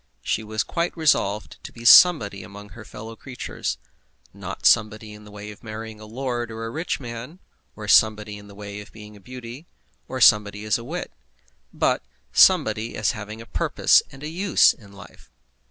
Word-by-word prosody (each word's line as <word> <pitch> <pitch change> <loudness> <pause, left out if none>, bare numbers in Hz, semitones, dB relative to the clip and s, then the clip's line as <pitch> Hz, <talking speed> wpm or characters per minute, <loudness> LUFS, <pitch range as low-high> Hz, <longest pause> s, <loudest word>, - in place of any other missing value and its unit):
She 110 - -1
was 110 0 -2
quite 170 0 -3
resolved 110 -10 0
to - - -9
be 115 0 -12
somebody 115 - +7
among 100 +2 -11
her 110 +1 -12
fellow 110 +2 -10
creatures, 125 +2 -5 0.6
not 95 0 -8
somebody 110 -1 +2
in 105 0 -13
the 105 - -13
way 105 +1 -9
of 105 - -15
marrying 110 0 -8
a 110 - -11
lord 120 0 -3
or 115 0 -6
a 115 - -5
rich 160 +7 -3
man, 125 +5 -8 0.4
or 105 -1 -8
somebody 105 -1 +3
in 100 - -14
the 100 - -14
way 100 0 -8
of 105 - -14
being 105 -1 -13
a - - -14
beauty, 125 - -10 0.4
or 130 - -5
somebody 105 -2 +4
as 110 +2 +1
a - - -9
wit; 165 +8 -5 0.6
but - - 0 0.3
somebody 110 +2 +4
as 105 - +1
having 110 0 -8
a - - -11
purpose - - +3
and 135 +1 -13
a - - -4
use 180 +4 +3
in 100 -3 -18
life. 100 0 -15
110 Hz, 185 wpm, -23 LUFS, 105-120 Hz, 0.6 s, somebody